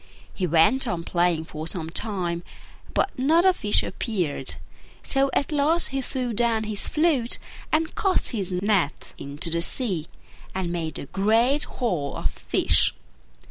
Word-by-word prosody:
He 185 - -2
went 175 - +4
on 175 -5 -2
playing 170 -2 0
for 155 0 -7
some 165 -2 +1
time, 180 -4 -1 0.5
but - - +1
not 320 +7 +3
a 375 - +6
fish 210 -11 +4
appeared: 175 - -3 0.5
so 275 0 +3
at 280 - -1
last 305 +4 +1
he 270 0 -2
threw 250 -2 -2
down 225 0 +1
his 215 -2 -2
flute 300 -7 +2 0.3
and 315 +1 +1
cast 390 -3 0
his 200 -6 -3
net 185 -4 -1
into 145 +4 -3
the 170 +1 +2
sea, 185 - +1 0.5
and 185 -2 -2
made 165 -2 -3
a - - -6
great 225 - +2
haul 175 - -3
of - - -2
fish. - - +1
205 Hz, 150 wpm, -24 LUFS, 170-265 Hz, 0.5 s, a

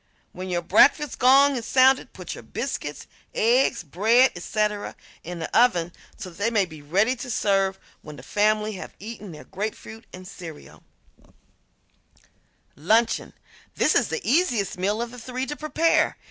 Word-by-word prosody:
When 185 +1 -7
your 175 -1 -1
breakfast 280 - +3
gong 275 +2 +5
is 235 -3 -5
sounded 265 0 +4
put - - -8
your - - -9
biscuits, - - -5 0.3
eggs, 240 -2 +2
bread, 220 - +3
etc., 210 +3 -2 0.3
in 175 +1 -7
the 160 - -6
oven 180 -8 +3 0.2
so 185 - -7
that 170 - -17
they 215 +3 +1
may 210 -4 +2
be 155 -4 -12
ready 200 - +1
to 250 +1 -7
serve 195 -4 +1 0.2
when 150 -1 -10
the - - -12
family 215 +1 +1
have 190 - -9
eaten 210 -2 -9
their 155 - -11
grapefruit 220 +3 -7
and 185 0 -11
cereal. 165 -5 -11 1.9
~Luncheon~ 220 +10 +1 0.4
This - - +2
is - - +2
the 445 - -5
easiest 245 - +1
meal 205 +5 -1
of 235 - -8
the 250 - -10
three 255 +2 -4
to 295 +3 -5
prepare. 310 +2 +1
215 Hz, 160 wpm, -24 LUFS, 185-250 Hz, 1.9 s, gong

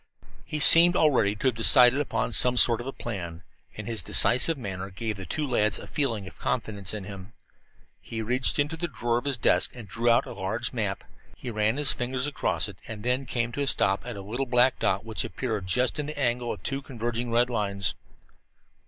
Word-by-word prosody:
He 150 +11 -5
seemed 170 +3 +8
already 125 - +2
to 105 - -2
have - - -4
decided 125 +4 +6
upon 115 -3 -3
some 125 +2 +6
sort 120 -1 +5
of 120 - -9
a - - -4
plan, 90 -9 -7 0.3
and 110 - -7
his 115 -3 -3
decisive 125 - +4
manner 95 -5 -6
gave 110 +3 -5
the 95 -2 -9
two 150 -2 -2
lads 110 -5 +1
a - - -9
feeling 120 - -3
of 95 - -13
confidence 105 -5 -3
in 105 -2 -5
him. 100 +2 -11 0.7
He 110 -1 -6
reached 125 +4 0
into 150 +3 -2
a - - 0
drawer 120 -6 -2
of 120 - -14
his 140 -3 -2
desk 95 -2 +1
and 115 -4 -10
drew 115 +5 -1
out 120 +3 +3
a - - -9
large 110 +6 -4
map. 100 -5 -3 0.3
He 125 - -7
ran 110 +3 0
his 145 -2 +2
fingers 125 +1 -3
across 95 - -2
it 100 -2 -12
and 105 -2 -8
then 125 +2 -1
came 120 -1 -2
to 145 - -5
a 140 - -2
stop 100 -6 +1
at 120 -3 -8
a 100 - -8
little 120 +7 -4
black 125 +1 +2
dot 95 +3 -1
which 110 -1 -3
appeared 110 -7 -5
just 125 +9 0
in 145 - -3
the 150 - -7
angle 120 -3 -1
of - - -8
two 135 0 -3
converging 120 -2 -5
red 120 +1 +1
lines. 100 -3 -2
120 Hz, 215 wpm, -25 LUFS, 105-130 Hz, 0.7 s, seemed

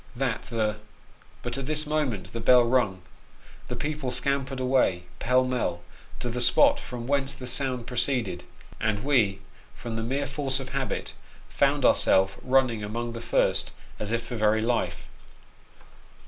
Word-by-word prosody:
That 125 -2 -1
the 110 -3 -1 0.7
but - - -3
at 135 - -5
this 155 0 0
momment 130 -11 -2
the 115 - -3
bell 125 +2 +6
rung; 115 -7 +1 0.6
the - - -4
people 150 -3 -3
scampered 135 +1 -1
away, 125 -9 +2 0.2
pell 125 +2 +3
mell, 120 -9 -1 0.4
to 125 - -2
the 125 +1 -3
spot 285 - +5
from 125 - -7
whence 140 +1 0
the 130 - -8
sound 125 -1 -1
proceeded; 120 -7 0 0.4
and 110 -1 0
we, 120 -9 +2 0.3
from 115 -1 -5
the - - -1
mere 135 +5 -1
force 140 -1 -2
of 130 -1 -7
habit, 135 -1 -3 0.4
found - - +2
our - - +7
self 95 +1 +2
running 125 -4 +2
among 115 +3 -3
the 115 - -6
first, - - +1 0.3
as 105 0 -3
if 115 0 0
for 120 - -5
very 110 0 +2
life. 120 +1 -1
125 Hz, 160 wpm, -27 LUFS, 110-135 Hz, 0.7 s, our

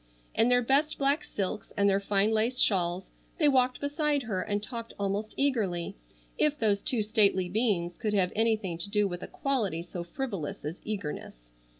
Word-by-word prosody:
In 230 - +3
their 245 0 +4
best 280 +5 +2
black 280 +2 +1
silks 205 +1 -4
and 200 0 +4
their 195 0 +3
fine 200 +1 +2
lace 225 +3 +1
shawls 180 -5 +1 0.3
they 310 -5 +4
walked 255 -2 +3
beside 290 -1 0
her 200 -5 -2
and 205 0 -2
talked 230 0 -6
almost 200 +2 -2
eagerly, 200 -10 0 0.4
if 300 -1 +2
those 205 -4 +2
two 245 -7 +2
stately 205 -4 +3
beings 180 -4 0
could 215 -3 -1
have 185 -2 +2
anything 215 -6 0
to 175 - 0
do 210 -1 +2
with 175 -1 -5
a - - -6
quality 215 - -1
so 175 0 -6
frivolous 190 - -5
as 155 +4 -5
eagerness. 150 - -6
210 Hz, 180 wpm, -29 LUFS, 190-250 Hz, 0.4 s, their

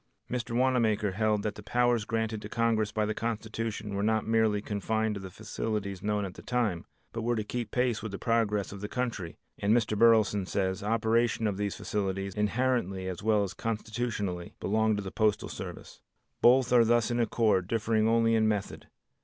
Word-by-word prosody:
Mr. 120 -2 -2
Wanamaker 115 -5 +2
held 105 +1 +1
that 105 - -1
the - - -10
powers 120 0 +1
granted 110 -1 -2
to 105 - -8
Congress 115 -2 +1
by 110 -1 0
the 110 - -1
Constitution 110 -1 -3
were 100 - -1
not 110 +1 +1
merely 110 -2 +2
confined 110 +2 -1
to 100 - -6
the 95 - -7
facilities 105 -1 -4
known 105 0 0
at 95 - -7
the - - -11
time, 115 -9 -1 0.3
but 115 - -3
were 120 +1 0
to 110 - -1
keep 120 +2 -4
pace 125 -3 0
with 110 -1 -5
the 100 - -4
progress 110 -3 0
of 100 -1 -8
the 105 - -3
country, 115 -9 -3 0.2
and 105 +4 +3
Mr. 110 -2 0
Burleson 105 -3 +4
says, 95 0 -1
operation 115 +2 +1
of 100 -3 0
these 100 -1 -2
facilities 95 -1 -2
inherently 105 -3 0
as 90 -1 -5
well 105 -1 +3
as 95 - -4
constitutionally, 110 -5 -3
belongs 110 +1 +1
to 100 - -3
the 95 - -6
postal 110 -2 +1
service. - - -8 0.4
Both 125 0 +5
are 120 -1 +7
thus 120 0 +2
in 120 - 0
accord, 110 -5 +2
differing 110 0 +1
only 115 0 +3
in 110 -1 +3
method. 105 -2 -2
110 Hz, 190 wpm, -29 LUFS, 100-115 Hz, 0.4 s, are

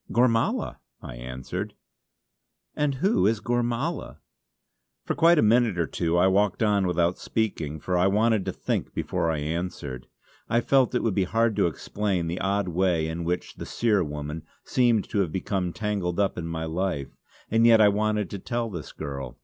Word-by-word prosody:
"Gormala!" 115 -2 +1 0.2
I - - -9
answered. 65 +1 -6 1.0
"And 145 -2 0
who 195 - +2
is 110 0 +1
Gormala?" 120 +7 -2 0.9
For - - 0
quite 170 +1 +5
a - - +4
minute 115 -2 +3
or 85 - +1
two 85 +1 -1
I 90 - +5
walked 100 +3 +2
on 100 -3 +2
without 85 0 +1
speaking, 80 -9 -2
for 90 +4 -2
I 90 +2 +4
wanted 110 +1 +2
to - - -1
think - - -3
before 85 - -1
I 80 - 0
answered. 75 -4 -4 0.4
I 120 - +3
felt 130 +1 +3
that - - 0
it - - -5
would 115 - +1
be 95 -1 +1
hard 115 +2 +1
to - - +4
explain 95 +2 -2
the 85 +2 -3
odd 100 0 0
way 90 -2 +1
in 80 +1 -4
which 90 +1 -3
the - - -6
Seer 105 -5 +1
woman 75 +1 -5 0.2
seemed 120 -4 +2
to 105 - 0
have 90 -5 +1
become 95 0 -2
tangled 100 -4 -2
up 100 -1 +1
in 85 -1 -4
my 80 -1 -3
life; 80 -3 -3 0.4
and 115 +1 +5
yet 115 -1 +7
I 105 -1 +7
wanted 105 -1 0
to 100 - -5
tell 120 +2 -3
this 85 -5 -7
girl. 70 -4 -6
95 Hz, 185 wpm, -26 LUFS, 85-115 Hz, 1.0 s, yet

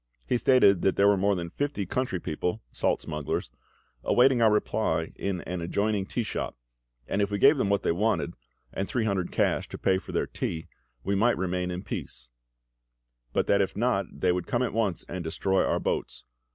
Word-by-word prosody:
He 125 - +2
stated 110 -10 +5
that 95 - +2
there 100 - +4
were 100 - +5
more 100 +1 +2
than 85 -2 -4
fifty 145 -4 -2
country 125 -1 -1
people 90 +7 -3
(salt - - 0
smugglers) 75 -2 -3 0.5
awaiting 125 0 +4
our 110 -2 +6
reply 105 - 0
in 95 -3 -3
an 90 -1 -5
adjoining 100 +3 0
tea 120 - -2
shop; 105 - -4 0.5
and 100 - 0
if 100 - +1
we 100 - -1
gave 140 +8 +6
them 115 -7 +1
what 100 0 +1
they - - +2
wanted, 105 +6 0 0.4
and 95 - -2
three 120 -3 -1
hundred 95 -4 -1
cash - - +1
to - - -6
pay 95 -1 +2
for - - -10
their - - 0
tea, 80 -1 -4 0.4
we 100 - 0
might 115 +5 +3
remain 90 -1 -1
in 90 +1 -4
peace; - - -7 1.0
but - - +1
that 100 0 +3
if 95 - -2
not, 105 -5 +1
they 90 - +1
would 90 0 -2
come 120 +1 +1
at 125 - -2
once 105 -6 -1
and 90 0 -5
destroy 95 +4 +1
our - - +1
boats. - - -3
100 Hz, 200 wpm, -27 LUFS, 90-110 Hz, 1.0 s, our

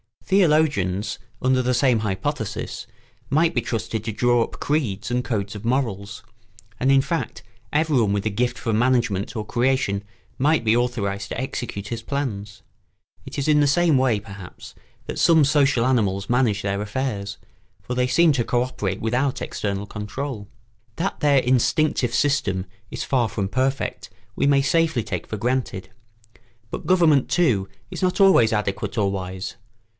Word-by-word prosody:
Theologians, 150 - +2 0.2
under 130 0 +3
the 125 0 +1
same 125 -2 +3
hypothesis, 105 +2 -3 0.4
might 160 +4 +3
be 120 - +1
trusted 110 -2 -3
to 110 - -3
draw 120 +2 +3
up - - -9
creeds 120 -9 -1
and 125 0 0
codes 105 -3 -2
of 105 +2 -8
morals; 110 -6 -2 0.6
and, 130 - +2
in 135 0 +6
fact, 165 +4 -3 0.3
everyone 145 -9 +2
with 100 0 -1
a 110 - 0
gift 120 +4 -1
for 115 - -2
management 115 -4 +1
or 110 -2 -3
creation 120 -4 0 0.4
might 150 +1 +3
be 110 0 +3
authorised 100 -5 -1
to - - -4
execute 115 -6 -4
his 115 -1 -4
plans. 105 - -4 0.6
It - - -8
is 140 +2 0
in 150 -1 +5
this 145 -1 +3
way, 130 -10 +3
perhaps, 100 -2 -11 0.3
that - - -5
some 160 -2 +5
social 140 -4 +3
animals 100 -6 +1
manage 120 -5 +2
their 100 0 -1
affairs, 105 -2 -3 0.5
for 125 - -4
they 125 0 +1
seem 165 +5 +4
to 125 -5 0
co 120 0 +1
operate 105 -7 -3
without 125 +4 0
external 100 -1 -3
control. 105 +2 -5 0.5
That 190 +4 -2
their 145 -3 +4
instinctive 130 0 +1
system 100 -10 +1 0.2
is - - -4
far 125 -4 +1
from 100 -2 -3
perfect 135 +4 -1 0.3
we - - +2
may 140 -1 +4
safely 160 -4 +2
take - - -4
for 110 - -4
granted; 120 -4 -2 0.8
but - - -6
government, 165 -7 +4
too, 115 - +2 0.2
is - - -6
not 185 +1 +1
always 190 - +6
adequate 105 +3 -2
or 100 -2 +2
wise. 95 -1 -5
120 Hz, 160 wpm, -23 LUFS, 105-140 Hz, 0.8 s, in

